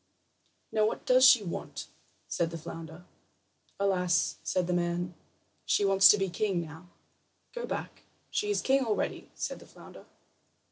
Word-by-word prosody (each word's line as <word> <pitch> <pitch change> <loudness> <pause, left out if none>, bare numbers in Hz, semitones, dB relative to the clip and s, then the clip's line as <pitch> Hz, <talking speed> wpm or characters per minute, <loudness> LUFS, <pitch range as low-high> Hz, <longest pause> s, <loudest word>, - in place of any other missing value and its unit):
"Now, 215 -1 +2
what - - -4
does 255 0 +5
she 225 - +5
want?" 175 - -6 0.4
said 170 -1 -1
the 165 - -6
flounder. 165 +1 -9 0.7
"Alas," 180 -5 +1
said 185 -1 -1
the 180 - -1
man, 175 0 -1 0.5
"she 205 - +2
wants 195 0 +7
to 210 - +7
be 195 -1 0
king 190 +1 -1
now." 165 +1 -8 0.7
"Go 485 0 -5
back. - - -5 0.3
She 415 - -1
is 410 - +1
king 270 0 +3
already," 220 -4 -2
said - - -4
the - - -15
flounder. - - -14
185 Hz, 150 wpm, -29 LUFS, 170-215 Hz, 0.7 s, wants